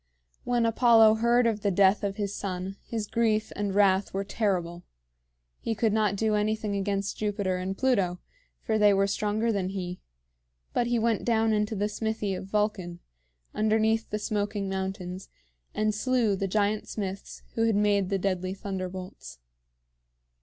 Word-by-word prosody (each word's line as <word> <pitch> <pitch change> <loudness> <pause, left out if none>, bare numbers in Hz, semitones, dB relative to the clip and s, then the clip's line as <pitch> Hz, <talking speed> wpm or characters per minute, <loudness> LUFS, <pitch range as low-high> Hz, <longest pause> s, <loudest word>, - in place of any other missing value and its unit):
When 240 -1 +1
Apollo 225 -1 +5
heard 240 +1 +4
of 220 -2 0
the 200 - +1
death 195 +2 +3
of 200 -1 -1
his 200 -1 -3
son, 190 -1 -4
his 225 -2 -4
grief 220 -1 0
and 200 -1 -2
wrath 195 -1 +3
were 195 - 0
terrible. 180 -5 -2 0.8
He 225 - -2
could 220 -1 +1
not 210 -2 +2
do 220 +1 0
anything 210 0 0
against 200 0 -2
Jupiter 200 -3 -1
and 190 +1 -4
Pluto, 195 -9 +1 0.4
for 220 -1 0
they 205 -1 +5
were 195 0 +3
stronger 210 +3 0
than 195 -3 -1
he; 180 -2 -5 0.7
but 240 - +1
he 240 0 +1
went 230 -2 +1
down 225 -1 +2
into 210 +1 0
the 205 +1 0
smithy 215 -1 -2
of 190 +1 -6
Vulcan, 195 -4 -1 0.5
underneath 220 +1 +1
the 210 - -2
smoking 205 -1 -2
mountains, 190 -1 -4 0.5
and 215 0 +1
slew 230 -1 +1
the 195 +1 -2
giant 210 +2 0
smiths 195 -2 -6
who 225 - +1
had 225 - +2
made 205 -2 +2
the 195 - +1
deadly 185 -1 -2
thunderbolts. 185 - -6
205 Hz, 160 wpm, -27 LUFS, 195-220 Hz, 0.8 s, Apollo